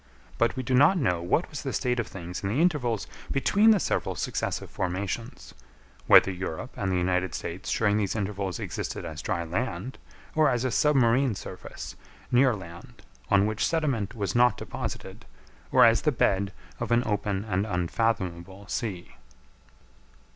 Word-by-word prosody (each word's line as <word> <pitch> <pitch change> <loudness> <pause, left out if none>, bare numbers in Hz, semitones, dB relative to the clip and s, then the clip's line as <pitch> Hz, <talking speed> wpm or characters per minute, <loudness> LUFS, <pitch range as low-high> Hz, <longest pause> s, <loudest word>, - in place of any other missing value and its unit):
But 115 -1 +2
we 130 - -3
do 130 - -2
not 145 +9 +6
know 90 - +1
what 90 - +1
was 150 - -5
the 135 - -3
state 125 -2 0
of 115 - -1
things 90 -1 -7
in 95 - -2
the 115 +8 0
intervals 130 - +1 0.3
between 205 +10 +4
the 215 -3 +6
several - - -1
successive - - -3
formations; 95 +5 -4 0.5
whether 100 - +7
Europe 90 +4 -5
and 95 -2 -2
the 90 - +1
United 90 -1 0
States - - -5
during 105 -2 +2
these 105 -1 -1
intervals 100 -3 -3
existed - - -4
as 80 -1 -6
dry 85 - -2
land, 120 +9 -3 0.3
or 155 -1 +4
as 120 +1 0
a 130 - 0
submarine 130 -4 +3
surface 95 -1 -8 0.4
near 125 -1 +4
land, 85 -3 -11 0.3
on 100 0 +4
which 110 0 -1
sediment 135 - -1
was 100 -3 -2
not 120 -1 +4
deposited, - - -6 0.5
or - - +7
as 115 0 +5
the 150 - +2
bed 100 -5 +1 0.3
of - - -3
an 120 +1 +4
open 105 -1 -1
and 100 0 -1
unfathomable 95 0 -2
sea. 105 -8 -4
105 Hz, 160 wpm, -27 LUFS, 95-125 Hz, 0.5 s, whether